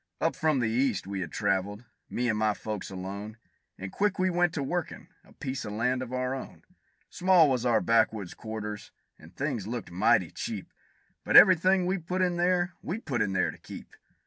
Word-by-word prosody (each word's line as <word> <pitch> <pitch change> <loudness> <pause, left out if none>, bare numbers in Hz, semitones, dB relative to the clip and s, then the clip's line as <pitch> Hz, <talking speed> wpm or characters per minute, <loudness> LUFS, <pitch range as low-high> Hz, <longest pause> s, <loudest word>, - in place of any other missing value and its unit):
Up - - 0
from 155 -3 +1
the 115 - +1
East 120 -3 0
we 100 0 -4
had 90 - -5
traveled, 100 +2 -1 0.2
me 125 +1 -1
and 110 - +1
my 110 -1 +1
folks 105 -3 -5
alone, 100 +3 -7 0.4
And 95 0 -7
quick 205 -1 0
we 185 0 +1
went 175 0 +2
to 145 - -1
workin' 170 +3 -4
a - - -21
piece 135 -2 -5
of 105 - -6
land 125 +4 0
of 130 -1 -6
our 130 0 -1
own; 135 - -8 0.5
Small 180 -3 +5
was 125 -3 0
our 115 -2 +3
backwoods 110 -4 +1
quarters, 105 -2 -6 0.3
and 80 +4 -16
things 130 -8 -3
looked 115 -5 -5
mighty 90 +2 +2
cheap; - - -6 0.5
But - - +5
every 185 -2 +10
thing 185 +2 +2
we 185 +1 0
put 180 +3 -2
in 175 -1 0
there, 175 0 +1
we 180 - -3
put 140 - -3
in 95 - 0
there 95 - +1
to - - -15
keep. - - -11
125 Hz, 200 wpm, -28 LUFS, 105-175 Hz, 0.5 s, every